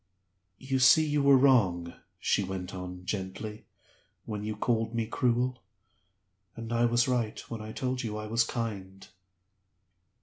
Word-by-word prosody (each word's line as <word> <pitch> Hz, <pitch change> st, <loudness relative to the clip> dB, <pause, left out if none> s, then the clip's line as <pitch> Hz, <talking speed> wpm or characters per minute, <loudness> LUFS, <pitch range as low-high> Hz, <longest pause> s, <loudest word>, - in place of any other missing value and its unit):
"You 135 Hz, +3 st, -2 dB
see 145 Hz, +5 st, +6 dB
you 150 Hz, -1 st, +1 dB
were 140 Hz, -1 st, +6 dB
wrong," 95 Hz, -11 st, +3 dB, 0.2 s
she 100 Hz, -, +1 dB
went 95 Hz, -1 st, -5 dB
on, 90 Hz, -1 st, -7 dB
gently, 100 Hz, +2 st, -5 dB, 0.6 s
"when 105 Hz, -2 st, -5 dB
you 105 Hz, 0 st, -3 dB
called 115 Hz, +1 st, -1 dB
me 115 Hz, -1 st, 0 dB
cruel 125 Hz, +2 st, 0 dB, 0.9 s
and 115 Hz, 0 st, -6 dB
I 120 Hz, +1 st, +3 dB
was 120 Hz, +1 st, +2 dB
right 120 Hz, -4 st, -1 dB
when 115 Hz, -2 st, -4 dB
I 110 Hz, 0 st, -7 dB
told 130 Hz, +2 st, -2 dB
you 105 Hz, -3 st, -4 dB
I 105 Hz, -, -5 dB
was 115 Hz, +2 st, +2 dB
kind." 100 Hz, -5 st, -5 dB
115 Hz, 145 wpm, -29 LUFS, 100-125 Hz, 0.9 s, see